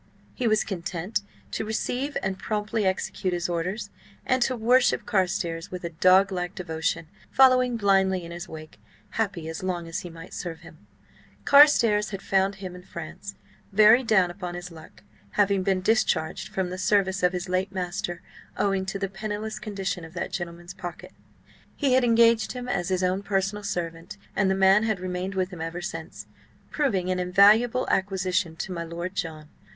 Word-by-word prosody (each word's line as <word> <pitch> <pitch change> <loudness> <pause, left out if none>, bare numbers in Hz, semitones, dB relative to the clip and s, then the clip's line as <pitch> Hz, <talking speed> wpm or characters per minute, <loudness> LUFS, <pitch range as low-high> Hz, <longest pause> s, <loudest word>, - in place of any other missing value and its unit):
He 250 - -1
was 215 -1 +3
content 180 +2 -3 0.3
to - - -2
receive 245 +6 -2
and 190 0 -2
promptly 210 -1 -1
execute 185 0 -1
his 175 0 -1
orders, 185 +5 -3 0.3
and 255 0 +1
to 255 +1 +2
worship 245 +3 +3
Carstares 180 -4 -1
with 180 -1 -7
a 170 - -4
dog 185 +4 +5
like 180 -1 -3
devotion, 165 -2 -2 0.2
following 255 -2 +5
blindly 190 -3 +2
in 170 - -9
his 175 +1 -7
wake, 155 0 -10 0.3
happy 195 -7 -2
as 160 0 -5
long 180 -2 -3
as 165 - -3
he 175 - -8
might 165 +1 -11
serve 165 -3 -6
him. - - -16 0.6
Carstares 240 -8 +6
had 195 -2 -6
found 195 0 +1
him 190 -2 -7
in 180 - -10
France, 180 +2 -8 0.4
very 215 +4 +7
down 190 -6 +3
upon 175 -1 -6
his 175 0 -7
luck, 160 -1 -14 0.3
having 200 -1 +2
been 185 0 +1
discharged 190 -6 +1
from 185 -2 -3
the 185 - -5
service 190 0 +2
of 180 0 +3
his 180 +2 -3
late 185 +2 -1
master 180 -1 -4 0.3
owing 195 -2 0
to 195 - -2
the 195 0 -2
penniless 210 +2 -5
condition 195 -4 -4
of 165 +2 -11
that 170 - -3
gentleman's 175 0 -6
pocket. 175 -1 -8 0.6
He 275 -3 +1
had 260 0 +4
engaged 230 -1 +4
him 250 -1 -6
as 180 -7 -1
his 185 -1 0
own 185 +2 +1
personal 200 +1 -1
servant, 170 -3 -4 0.2
and 195 -1 +2
the 190 - +2
man 195 +2 +5
had 215 -3 0
remained 185 +1 -4
with 185 0 -1
him 175 -3 -8
ever 165 +2 -4
since, 175 - -7 0.5
proving 195 - 0
an 180 - 0
invaluable 205 +7 +4
acquisition 190 -3 0
to 185 - -5
my 170 -2 -3
Lord 170 +2 -5
John. 160 -5 -5
190 Hz, 175 wpm, -26 LUFS, 175-210 Hz, 0.6 s, very